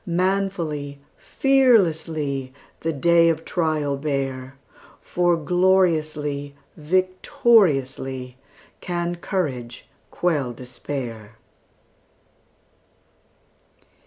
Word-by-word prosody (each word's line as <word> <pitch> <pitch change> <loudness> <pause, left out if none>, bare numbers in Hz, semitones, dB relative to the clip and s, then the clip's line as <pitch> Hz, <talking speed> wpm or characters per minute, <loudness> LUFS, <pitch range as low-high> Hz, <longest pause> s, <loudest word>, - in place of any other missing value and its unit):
Manfully, 175 -6 -1 0.2
fearlessly, 165 - +1 0.3
The 165 - -1
day 165 +3 +4
of 160 0 -2
trial 155 -5 -1
bear, 135 -2 -3 0.4
For 175 -1 +1
gloriously, 155 -5 +1 0.2
victoriously, 155 - +1 0.4
Can 175 0 -3
courage 130 - -4 0.2
quell 145 -8 -1
despair! 120 -3 -7
155 Hz, 60 wpm, -23 LUFS, 135-180 Hz, 0.4 s, day